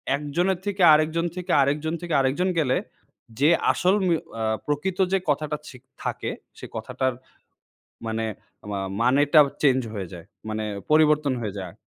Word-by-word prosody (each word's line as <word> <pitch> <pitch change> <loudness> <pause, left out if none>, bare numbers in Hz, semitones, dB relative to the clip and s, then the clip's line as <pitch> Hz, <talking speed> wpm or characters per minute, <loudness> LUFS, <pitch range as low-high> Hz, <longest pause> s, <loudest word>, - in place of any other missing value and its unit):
একজনের 170 +6 -1
থেকে 200 -2 -2
আরেকজন 160 +2 +2
থেকে, 180 -1 -4
আরেকজন 150 +4 0
থেকে 170 -2 -4
আরেকজন 145 +8 +1
গেলে। 130 -4 +2 0.6
যে 150 +3 +5 0.2
আসল 185 +1 +2
উম 185 - +1
এ্যা 115 -8 -4 0.2
প্রকৃত 175 +6 -2
যে - - +5
কথাটা 150 +1 0
ঠিক 125 -2 -13 0.2
থাকে - - -3 0.3
সে - - -9
কথাটার 125 +3 -2 0.9
মানে 110 0 -2 0.5
মা 100 - -2 0.2
মানেটা 145 +5 +5 0.2
চেঞ্জ 130 -2 +4
হয়ে 95 -3 -4
যায়। 85 -2 -10 0.2
মানে 110 0 -3 0.3
পরিবর্তন 150 -2 +4
হয়ে 105 -3 -4
যায় 90 -3 -7
145 Hz, 145 wpm, -24 LUFS, 125-165 Hz, 0.9 s, যে